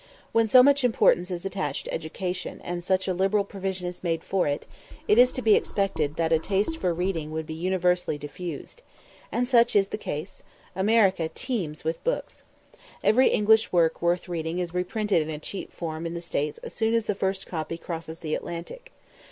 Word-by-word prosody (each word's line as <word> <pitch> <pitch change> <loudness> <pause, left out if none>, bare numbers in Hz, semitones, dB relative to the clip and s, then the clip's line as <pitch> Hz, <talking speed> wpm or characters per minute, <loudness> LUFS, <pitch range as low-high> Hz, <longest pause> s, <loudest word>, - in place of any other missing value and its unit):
When 230 -1 +3
so 250 +3 +8
much 280 0 +4
importance 195 -6 +3
is 180 0 -4
attached 180 -7 -2
to - - -5
education, 180 +3 -4
and 175 0 -4
such 185 +1 +1
a 185 - +1
liberal 195 +3 +2
provision 190 -2 -4
is 180 +1 -7
made 165 -2 -1
for 190 -4 0
it, 145 0 -2 0.4
it 210 - +5
is 250 +1 +7
to 255 - -4
be 220 - +6
expected 160 -10 0
that 165 0 +1
a 160 - +4
taste 200 - 0
for 180 - 0
reading 170 -3 -2
would 160 0 -4
be 160 - -6
universally 180 -1 0
diffused. 160 - -7 0.5
And 245 +1 0
such 235 -3 +4
is 195 -1 +4
the - - -4
case: 170 +1 -5 0.3
America 190 -4 +3
teems 175 - -4
with 160 +1 -3
books. - - -2 0.6
Every 255 +4 +5
English 220 +1 +4
work 165 -2 +2
worth 175 +2 +1
reading 165 -1 -3
is 175 -2 -3
reprinted 190 +1 0
in 155 - -4
a 155 - -3
cheap 185 +6 -7
form 165 -1 -4
in 170 - -5
the - - -3
States 150 -3 -2
as - - -7
soon 225 +1 +1
as 230 -2 +1
the 210 - 0
first 190 0 -2
copy 165 -1 -4
crosses 165 -1 -7
the 155 -2 -3
Atlantic. 460 - -6
180 Hz, 195 wpm, -26 LUFS, 165-205 Hz, 0.6 s, so